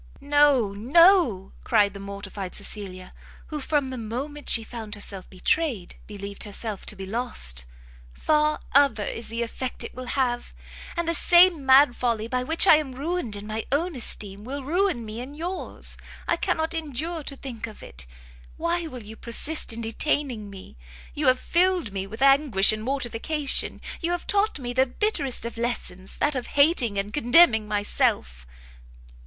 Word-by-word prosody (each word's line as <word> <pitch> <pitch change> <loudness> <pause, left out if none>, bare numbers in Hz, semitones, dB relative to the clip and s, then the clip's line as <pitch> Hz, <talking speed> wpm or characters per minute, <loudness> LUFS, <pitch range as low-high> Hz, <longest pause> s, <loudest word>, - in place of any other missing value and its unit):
"No, 285 -5 +3
no," 255 - +4
cried 205 -3 +3
the 200 - -9
mortified 200 -1 -7
Cecilia, 195 -3 -6 0.4
who 300 -2 -4
from 285 -1 0
the 255 - -5
moment 270 +7 -4
she 225 - +5
found 220 -2 -6
herself 195 -2 -3
betrayed, 210 - 0
believed 200 -1 -7
herself 210 0 -4
to - - -6
be 190 -1 -7
lost, 190 - 0 0.5
"far 300 - +1
other 270 -6 +4
is 230 - -4
the 230 +1 -2
effect 250 +2 -3
it - - -7
will 255 0 -8
have! 245 -3 -1 0.4
and 340 -1 -1
the 335 - +1
same 345 -4 +5
mad 265 -1 +6
folly 230 -3 -1
by 250 +1 -1
which 320 +8 +3
I 315 - +8
am 275 -4 -4
ruined 290 -5 -2
in 205 0 -7
my 215 +1 -4
own 330 +4 0
esteem, 205 -4 -6
will 275 +4 -5
ruin 340 - 0
me 215 +1 -6
in 275 +4 -8
yours! 350 +4 -3 0.3
I - - +2
cannot 320 +1 -1
endure 320 +1 -3
to 280 -1 -5
think 235 -4 -7
of 215 - -12
it! - - -8 0.5
why 335 0 -1
will 250 -6 -9
you 215 +2 -10
persist 255 +6 0
in 230 +1 -2
detaining 230 -1 -1
me? 195 - -12 0.4
You 290 -1 0
have 255 0 +4
filled 350 - +1
me 195 0 -3
with 220 +6 -4
anguish 270 -8 +5
and 215 - -4
mortification, 275 +3 0 0.2
you 335 - -1
have 350 - -4
taught 410 -1 +1
me 245 -3 -5
the 260 +1 +3
bitterest 280 - -1
of 235 0 -6
lessons, 195 -6 -4
that 295 - +1
of 255 -3 -4
hating 280 - +4
and 200 +2 -2
contemning 240 -5 +5
myself!" 65 - -1
245 Hz, 170 wpm, -25 LUFS, 210-300 Hz, 0.5 s, I